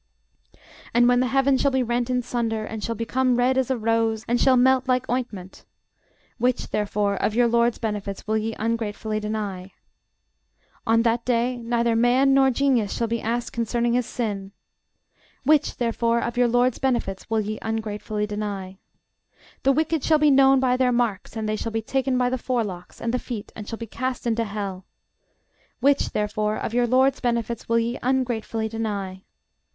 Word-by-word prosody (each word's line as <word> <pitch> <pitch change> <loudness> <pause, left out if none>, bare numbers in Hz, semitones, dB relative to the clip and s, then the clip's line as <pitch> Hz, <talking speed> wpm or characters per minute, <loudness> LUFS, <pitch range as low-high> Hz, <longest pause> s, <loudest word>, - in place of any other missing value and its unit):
And 240 0 +5
when 245 0 +4
the 255 - +2
heaven 270 +1 +2
shall 280 - +3
be 265 -1 +1
rent 240 +1 -1
in 250 -1 0
sunder, 230 -3 -2
and 220 -1 -6
shall 230 - -2
become 250 +3 +1
red 250 +2 +2
as 265 -1 +1
a 260 - +1
rose, 225 -1 0
and 240 +1 +1
shall 260 -1 +5
melt 260 +1 +3
like 255 0 +1
ointment: 220 -7 -4 0.8
(Which, 250 +1 0
therefore, 205 -1 0
of 210 - -1
your 240 0 +4
LORD'S 235 0 +2
benefits 205 -3 -4
will 215 - 0
ye 225 +1 -3
ungratefully 220 -1 -2
deny?) 205 -3 -4 1.1
On 230 +1 +4
that 235 0 +1
day 245 0 0
neither 235 0 0
man 250 +4 +4
nor 270 0 +5
genius 255 -5 +1
shall 230 - 0
be 230 0 -2
asked 235 +2 -2
concerning 235 +1 0
his 245 -1 +1
sin. 200 -5 -4 0.9
Which, 300 +2 +2
therefore, 235 0 +1
of 235 0 -3
your 245 0 +3
LORD'S 245 +1 +2
benefits 235 -8 -1
will 225 -1 +1
ye 215 +1 -4
ungratefully 215 -1 -3
deny? 200 -2 -5 0.8
The 275 - +4
wicked 315 +1 0
shall 315 - +4
be 300 -1 +4
known 270 0 +6
by 255 -1 +2
their 255 -1 +2
marks; 235 -6 -1
and 220 -1 -2
they 215 - 0
shall 225 +1 -4
be 225 0 -2
taken 265 +2 0
by 250 0 +1
the 255 - -1
forelocks, 210 -9 -3
and 230 0 -2
the 250 - +1
feet, 230 -5 -6
and 210 -1 -8
shall 225 - -5
be 230 - -6
cast 255 +3 -4
into 230 -1 0
hell. 200 -3 -5 1.0
Which, 275 +3 +3
therefore, 210 0 -1
of 225 - -4
your 245 0 +2
LORD'S 260 +3 +3
benefits 235 -2 -2
will 230 - +3
ye 230 +2 -1
ungratefully 240 -3 -1
deny? 205 -4 -4
235 Hz, 180 wpm, -24 LUFS, 215-250 Hz, 1.1 s, known